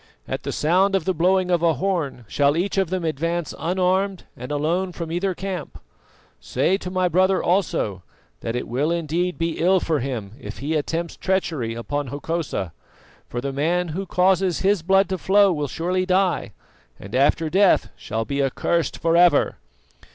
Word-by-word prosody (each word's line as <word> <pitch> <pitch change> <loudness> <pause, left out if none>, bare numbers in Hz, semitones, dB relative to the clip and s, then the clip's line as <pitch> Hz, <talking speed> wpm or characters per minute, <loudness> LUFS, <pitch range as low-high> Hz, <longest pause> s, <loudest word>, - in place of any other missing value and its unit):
At - - -3
the - - -4
sound 185 +5 +2
of 195 - 0
the 190 - +1
blowing 180 +2 +2
of 175 -2 +2
a 165 -2 +3
horn 145 -7 -2
shall 145 +5 +2
each 185 +4 -1
of 190 -4 +1
them 185 -2 -2
advance 165 +2 -2
unarmed 185 +2 0
and 125 +3 -8
alone 170 +5 0
from 165 -2 -5
either 180 +2 -1
camp. 185 -5 -5 0.6
Say 140 +9 +1
to 180 - -6
my 185 0 +1
brother 185 +2 +2
also 170 - 0 0.4
that 115 - -4
it 125 - -3
will 135 +6 0
indeed 170 +2 -1
be 165 -1 -2
ill 185 +3 +4
for 160 -3 0
him 120 -6 -4
if - - -8
he 145 +4 -3
attempts 165 +2 -2
treachery 160 -12 -1
upon 145 +5 -3
Hokosa, 145 - -3 0.6
for 120 - -3
the 135 +1 -3
man 170 +5 0
who 190 +5 -4
causes 185 0 +2
his 195 -1 +2
blood 195 +3 +3
to 190 -1 -2
flow 200 +1 +4
will 150 -2 -2
surely 180 +5 -1
die, 185 - +1 0.5
and 100 +3 -11
after 145 +5 +3
death 190 +4 +3
shall 110 +1 -4
be 140 +2 -1
accursed 160 +5 0
for 165 0 +1
ever." 175 0 +4
170 Hz, 175 wpm, -23 LUFS, 145-185 Hz, 0.6 s, ill